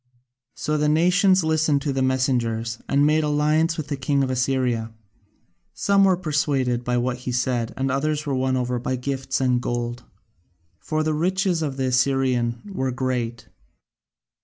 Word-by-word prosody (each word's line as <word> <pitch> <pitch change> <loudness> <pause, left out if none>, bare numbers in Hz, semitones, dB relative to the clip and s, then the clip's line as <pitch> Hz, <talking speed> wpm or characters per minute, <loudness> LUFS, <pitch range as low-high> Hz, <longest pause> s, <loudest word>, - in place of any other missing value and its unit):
So 150 0 -1
the 150 0 +2
nations 180 +4 +4
listened 155 -3 +1
to 145 - -1
the 135 - -1
messengers 120 -4 0
and 140 +1 +3
made 155 +1 +3
alliance 150 +2 +1
with 150 -3 -5
the 145 - -1
king 140 0 0
of 130 - -1
Assyria: 125 -3 0 0.8
some 200 -1 +3
were 185 -2 +3
persuaded 140 -7 0
by 125 0 0
what 125 +1 -1
he 125 0 -5
said 125 -2 -1
and 135 0 0
others 150 +2 -1
were 140 - -1
won 130 0 0
over 125 -1 -1
by 130 +2 -2
gifts 135 +1 -3
and 125 -2 +1
gold, 120 0 -3 0.8
for 155 - -2
the 155 0 0
riches 180 +2 0
of 140 -4 -3
the 135 - -1
Assyrian 125 -2 +1
were 130 -7 -1
great. 125 -2 -3
135 Hz, 160 wpm, -23 LUFS, 125-155 Hz, 0.8 s, nations